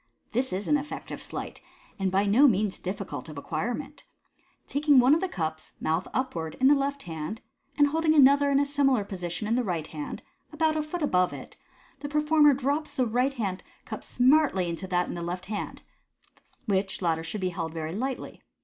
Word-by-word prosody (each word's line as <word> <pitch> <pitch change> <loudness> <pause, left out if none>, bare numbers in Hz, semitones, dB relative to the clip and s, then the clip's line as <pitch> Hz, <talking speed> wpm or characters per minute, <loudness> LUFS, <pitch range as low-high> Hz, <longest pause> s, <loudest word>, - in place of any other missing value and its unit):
— - - -43
This 255 +3 0
is 190 +3 -3
an 295 - +4
effective 290 +1 -6
sleight, - - -6 0.4
and 190 -1 +1
by 195 +2 +2
no 235 +9 +6
means 210 -4 +1
difficult 185 -7 -5
of 150 - -9
acquirement. 245 - -4 0.6
Taking 290 0 +3
one 255 +3 +6
of 320 - +3
the 380 - -1
cups, 160 - -3
mouth 160 +3 -1
upwards, 170 -12 -2
in 265 +1 +5
the - - +7
left 280 0 -1
h? 165 - -5
nd, 160 +8 -5 0.4
and 290 - +6
holding 315 +1 +2
another 280 0 +6
in 275 0 +3
a 285 - +3
similar 275 -5 +2
position 180 0 -4
in 225 - +1
the 250 +1 +2
right 170 -7 -2
hand, 150 -2 -7 0.3
about 310 0 +1
a 310 - +1
foot 305 +2 -4
above 180 -10 +2
it, - - -9 0.4
the 285 +1 -5
performer 300 -1 +4
drops 285 +4 -2
the 255 -3 +2
right 250 +4 +1
hand 195 -7 -3 0.2
cup - - -5
s - - -10
nartly 260 - +4
into 170 +3 -4
that 180 -1 +1
in - - -5
the 175 - -5
left 180 +2 -4
hand 210 0 -5 0.8
(which 195 -3 -1
latter 165 -1 +1
should 180 +5 -5
be 185 - 0
held 165 -2 -4
very 160 0 -4
lightly). 260 +6 -4
230 Hz, 205 wpm, -27 LUFS, 180-285 Hz, 0.8 s, the